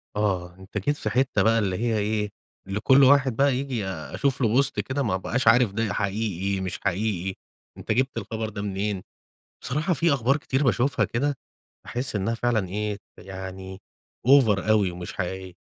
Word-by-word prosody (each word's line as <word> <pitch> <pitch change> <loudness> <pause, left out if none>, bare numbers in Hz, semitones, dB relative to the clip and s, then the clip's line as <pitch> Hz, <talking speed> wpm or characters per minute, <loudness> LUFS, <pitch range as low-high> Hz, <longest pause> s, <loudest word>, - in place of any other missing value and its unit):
آه، 90 -4 -1
أنت 95 +2 -8
جيت 145 +9 0
في - - -2
حتة 130 -5 +1
بقى 115 +2 +4
اللي 95 -3 -1
هي 115 -1 0
إيه، 105 0 -1 0.4
اللي 95 +2 -2
كل 135 +4 +5
واحد 135 -2 +5
بقى 140 +1 +3
ييجي 130 -5 -2
أشوف 110 - -2
له 115 - +4
بوست 130 +5 +2
كده 140 +2 -1
ما 105 -7 0
ابقاش 115 +6 -2
عارف 120 -2 +6
ده 110 +1 -1
حقيقي، 100 -2 -1
مش 90 -2 -4
حقيقي، 95 -1 -1 0.4
أنت - - -4
جِبت 130 +5 +1
الخبر 110 -1 -3
ده 100 -1 -6
منين، 100 -1 -2 0.6
بصراحة 155 +7 0
في 165 +1 +2
أخبار 135 +2 +2
كتير 135 -1 -1
باشوفها 130 +2 +2
كده، 140 +3 -1 0.5
أحس 125 -1 -4
إنها 105 +3 0
فعلًا 115 -4 0
إيه، 105 +1 -2 0.2
يعني 95 0 -8 0.4
أوفر 115 -7 +5
أوي 105 -4 +3
ومش 90 0 -7
حقيقية. 95 0 -4
110 Hz, 170 wpm, -25 LUFS, 95-130 Hz, 0.6 s, عارف